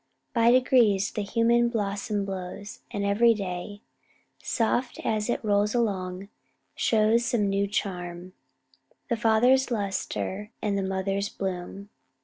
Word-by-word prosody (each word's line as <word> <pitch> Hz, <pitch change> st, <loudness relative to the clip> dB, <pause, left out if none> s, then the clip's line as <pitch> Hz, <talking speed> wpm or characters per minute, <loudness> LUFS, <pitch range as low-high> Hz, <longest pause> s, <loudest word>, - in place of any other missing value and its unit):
By 230 Hz, -1 st, +4 dB
degrees 240 Hz, -6 st, +4 dB
The 210 Hz, -, -3 dB
human 235 Hz, +3 st, +2 dB
blossom 205 Hz, -2 st, -2 dB
blows, 195 Hz, +1 st, -6 dB
and 200 Hz, 0 st, -3 dB
every 225 Hz, +3 st, +4 dB
day, 195 Hz, +1 st, -5 dB, 0.6 s
Soft 240 Hz, +2 st, -1 dB
as 215 Hz, +1 st, 0 dB
it 240 Hz, -, -1 dB
rolls 205 Hz, +2 st, +2 dB
along, 190 Hz, -4 st, -1 dB, 0.5 s
shows 225 Hz, +1 st, +2 dB
some 225 Hz, -4 st, +1 dB
new 200 Hz, 0 st, +1 dB
charm, 180 Hz, -3 st, -4 dB, 0.8 s
The 235 Hz, -, +2 dB
father's 235 Hz, +4 st, +3 dB
lustre, 205 Hz, -1 st, -3 dB
and 205 Hz, -2 st, -1 dB
the 200 Hz, -, 0 dB
mother's 195 Hz, +1 st, -1 dB
bloom." 190 Hz, +1 st, -5 dB
205 Hz, 125 wpm, -26 LUFS, 195-230 Hz, 0.8 s, By